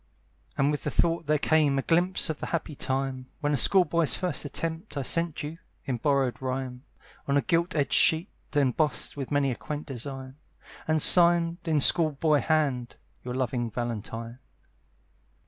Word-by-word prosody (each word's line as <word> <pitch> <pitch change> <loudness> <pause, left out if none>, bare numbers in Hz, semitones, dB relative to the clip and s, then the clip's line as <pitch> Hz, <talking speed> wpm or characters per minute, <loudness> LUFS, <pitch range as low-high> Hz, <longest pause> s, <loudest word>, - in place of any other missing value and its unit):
And 140 +1 +2
with 145 - -3
the - - 0
thought 165 -1 0
there 150 0 +3
came 150 -2 +2
A 135 - -1
glimpse 175 0 +1
of 155 - -8
the - - -5
happy 165 -2 -3
time 130 -1 -3
When 150 -2 -1
a - - +3
school 180 - +4
boy's 170 -3 +2
first 180 -4 -2
attempt 165 +5 -4
I 140 - -1
sent 165 +3 0
you, 155 +3 -7 0.3
in 130 -3 -2
borrowed 135 -1 0
rhyme, 130 0 -4 0.4
On 140 0 +2
a - - +3
gilt 170 -1 0
edged 140 -5 0
sheet, 165 +6 +4 0.3
embossed 145 +2 0
With 140 -3 -5
many 145 -2 +1
a - - -3
quaint 150 +4 -6
design, 135 0 -7 0.5
And 155 -1 +2
signed, 170 -1 +5
in 155 -3 +1
school 155 +1 +4
boy 150 +1 +2
hand, 140 -6 0 0.3
"Your 125 0 -5
loving 125 -2 -2
Valentine." 115 +1 -5
145 Hz, 170 wpm, -27 LUFS, 130-165 Hz, 0.5 s, signed